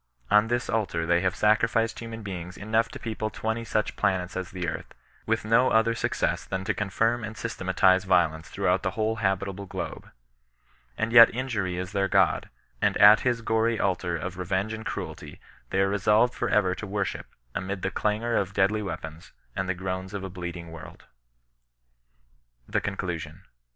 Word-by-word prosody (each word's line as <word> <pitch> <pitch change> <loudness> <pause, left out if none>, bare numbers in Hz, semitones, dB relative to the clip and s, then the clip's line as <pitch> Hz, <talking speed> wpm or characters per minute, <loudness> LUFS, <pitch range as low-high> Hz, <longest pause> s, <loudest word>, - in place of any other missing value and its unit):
On 105 +1 +5
this 120 +1 -1
altar 100 -7 -1
they 85 +1 +3
have 95 -1 0
sacrificed 115 +1 +2
human 115 -1 -7
beings 90 -3 -6
enough 110 +2 +1
to - - -8
people 110 -1 -3
twenty 110 +2 -3
such 110 -1 -1
planets 90 -1 0
as 95 -1 -4
the 90 -2 -4
earth, - - -6 0.3
with - - 0
no 115 +4 +4
other 110 +1 +3
success 115 - -1
than 95 0 -4
to - - 0
confirm 115 +4 0
and 110 0 -6
systematize 95 -4 +2
violence 80 -5 +2
throughout 90 +1 +1
the 95 0 -3
whole 110 +1 0
habitable 100 -1 -1
globe. - - -6 0.9
And 110 +1 -1
yet 115 -1 +10
injury 105 -8 -2
is 90 +2 -4
their 100 -1 +1
god, - - +2 0.3
and - - +2
at 105 +2 +8
his 120 -2 0
gory 110 0 +1
altar 90 -3 0
of 90 +3 -6
revenge 95 +4 -1
and 110 0 -6
cruelty - - -6 0.3
they 95 - +1
are 95 - +2
resolved 105 +4 +3
for 120 - -2
ever 95 -3 +3
to 105 - -6
worship, 100 0 -3 0.3
amid 95 0 -4
the 95 - 0
clangor 110 +3 0
of 100 -1 -1
deadly 100 +2 +2
weapons, 80 -4 -7 0.2
and 95 0 -2
the 95 - 0
groans 95 +1 -4
of 100 - -4
a 95 - -6
bleeding 85 -2 -6
world. 80 -2 -11 1.6
THE - - 0
CONCLUSION. 90 -4 -4
100 Hz, 175 wpm, -26 LUFS, 95-110 Hz, 1.6 s, yet